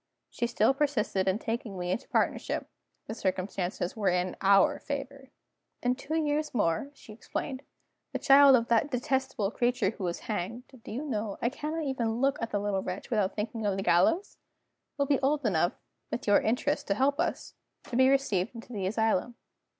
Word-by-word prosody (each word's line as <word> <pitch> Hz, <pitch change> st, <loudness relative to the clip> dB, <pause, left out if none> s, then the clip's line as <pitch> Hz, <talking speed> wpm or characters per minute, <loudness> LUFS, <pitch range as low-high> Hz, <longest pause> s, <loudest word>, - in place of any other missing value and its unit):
She 235 Hz, -, -1 dB
still 235 Hz, +1 st, +3 dB
persisted 260 Hz, -9 st, 0 dB
in 190 Hz, +1 st, +2 dB
taking 225 Hz, -3 st, -4 dB
me 180 Hz, 0 st, -2 dB
into 230 Hz, -, -3 dB
partnership -, -, 0 dB, 0.4 s
the -, -, -5 dB
circumstances 185 Hz, -3 st, -2 dB
were 210 Hz, -3 st, +1 dB
in 180 Hz, 0 st, 0 dB
our 195 Hz, 0 st, +5 dB
favor. 275 Hz, -1 st, -6 dB, 0.5 s
"In 245 Hz, 0 st, +3 dB
two 275 Hz, +4 st, -4 dB
years 300 Hz, -2 st, 0 dB
more," 185 Hz, +5 st, +1 dB
she 220 Hz, -, -13 dB
explained, 260 Hz, +4 st, -5 dB, 0.5 s
"the -, -, -2 dB
child 275 Hz, -1 st, +7 dB
of 235 Hz, -2 st, +1 dB
that 235 Hz, +5 st, +2 dB
detestable 260 Hz, -5 st, -1 dB
creature 240 Hz, -5 st, +1 dB
who 220 Hz, -, -8 dB
was 175 Hz, -1 st, -2 dB
hanged 215 Hz, +4 st, -4 dB, 0.2 s
do -, -, -9 dB
you 260 Hz, +8 st, -4 dB
know, 215 Hz, -7 st, -3 dB
I 235 Hz, -, +1 dB
cannot 305 Hz, +4 st, -4 dB
even 235 Hz, -5 st, -1 dB
look 275 Hz, +1 st, +1 dB
at 230 Hz, -, -2 dB
the 205 Hz, -, -1 dB
little 200 Hz, -1 st, -1 dB
wretch 185 Hz, +6 st, -6 dB
without 210 Hz, -4 st, +1 dB
thinking 220 Hz, +1 st, -3 dB
of 200 Hz, -2 st, 0 dB
the 195 Hz, -, -2 dB
gallows? 330 Hz, -, +2 dB, 0.6 s
will 280 Hz, -, +2 dB
be 280 Hz, -1 st, +2 dB
old 285 Hz, +1 st, +1 dB
enough 175 Hz, -3 st, +2 dB, 0.4 s
(with -, -, -4 dB
your 205 Hz, -1 st, +5 dB
interest 285 Hz, +6 st, 0 dB
to 200 Hz, -, +1 dB
help 280 Hz, +5 st, +1 dB
us) 345 Hz, -, -2 dB, 0.3 s
to -, -, -7 dB
be 260 Hz, +1 st, +5 dB
received 240 Hz, -7 st, +1 dB
into 230 Hz, +1 st, -10 dB
the 195 Hz, -3 st, -2 dB
asylum. 220 Hz, +2 st, 0 dB
230 Hz, 185 wpm, -29 LUFS, 200-275 Hz, 0.6 s, child